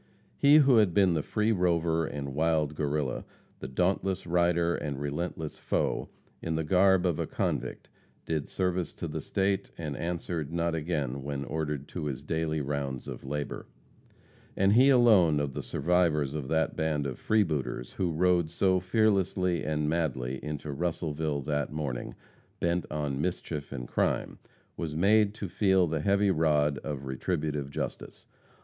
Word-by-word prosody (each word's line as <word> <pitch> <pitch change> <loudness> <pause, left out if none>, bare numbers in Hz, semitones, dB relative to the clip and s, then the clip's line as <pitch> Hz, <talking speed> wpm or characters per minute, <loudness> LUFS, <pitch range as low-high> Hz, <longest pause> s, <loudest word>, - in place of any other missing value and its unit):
He 140 +1 +6
who 140 -5 +6
had 105 -6 +3
been 95 -3 +5
the 80 - +1
free 105 +7 0
rover 85 -4 +1
and 70 -2 -5
wild 80 -1 +1
Guerrilla, 75 -3 -1 0.4
the - - -6
dauntless 95 +6 0
rider 85 0 +2
and 70 -4 -3
relentless 75 +2 -4
foe, - - -1 0.3
in 80 -1 -2
the 80 - 0
garb 95 +3 +4
of 85 -4 +1
a - - -1
convict - - -2 0.4
did 80 -3 -2
service 90 -2 -1
to - - -4
the - - -4
State, 95 0 0
and 75 -4 -4
answered 85 -2 -3
not 85 0 0
again 75 -5 -2
when 70 0 -4
ordered 75 -2 -3
to 85 -4 -5
his 70 -3 -4
daily 80 -1 -1
rounds 70 -2 -3
of - - -7
labor. 75 +2 -4 0.9
And 100 +1 +4
he 130 +5 +6
alone 105 - +5
of 70 -2 -2
the - - -4
survivors 80 -5 +1
of 75 -4 -4
that 80 +2 0
band 75 -2 0
of 65 -3 -4
freebooters 80 - 0
who 90 -3 -1
rode 85 0 +2
so 95 +2 +2
fearlessly 95 -3 +1
and 75 -1 -1
madly 65 -6 -1
into 75 0 -4
Russellville 80 -1 -2
that 75 0 -1
morning, 70 -5 -4 0.4
bent 85 0 0
on 75 -2 -2
mischief 80 -4 -3
and 60 -3 -5
crime, - - -1 0.4
was 80 -3 -4
made 105 +4 +4
to 105 - -5
feel 95 +1 +3
the 80 -2 -2
heavy 100 +3 +3
rod 75 -3 +2
of 70 -3 -5
retributive 75 +1 -2
justice. 70 - -6
80 Hz, 155 wpm, -29 LUFS, 75-90 Hz, 0.9 s, He